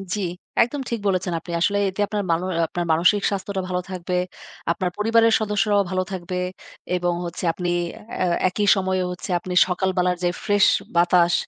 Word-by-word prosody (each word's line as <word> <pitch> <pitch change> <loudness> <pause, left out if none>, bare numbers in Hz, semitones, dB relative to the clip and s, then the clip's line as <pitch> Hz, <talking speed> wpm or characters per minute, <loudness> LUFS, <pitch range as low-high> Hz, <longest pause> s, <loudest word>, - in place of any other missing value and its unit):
জি, - - -3 0.4
একদম 270 +4 0
ঠিক 235 -2 -2
বলেছেন 185 -2 0
আপনি। 170 - -10
আসলে 200 +2 +2
এতে 190 +2 -4
আপনার 210 -1 -2
মান 165 - +2
অ - - -2 0.2
আপনার 175 +1 -3
মানসিক 180 +6 +4
স্বাস্থ্যটা 195 -1 -3
ভালো 180 0 -1
থাকবে। 180 0 -4 0.6
আপনার 180 +1 -1
পরিবারের 225 +1 +4
সদস্যরাও 205 -1 +2
ভালো 185 0 +1
থাকবে। 180 -1 -4 0.6
এবং 175 -1 0
হচ্ছে 170 - -6
আপনি 175 -1 -3 0.5
এ - - +2 0.2
একই 205 +2 -1
সময়ে 190 -1 0
হচ্ছে 180 - -7
আপনি 180 +1 -6
সকালবেলার 180 -1 +1
যে 175 - +3
ফ্রেশ 205 -2 +4 0.3
বাতাস, 175 0 +4
185 Hz, 165 wpm, -23 LUFS, 180-205 Hz, 0.6 s, মানসিক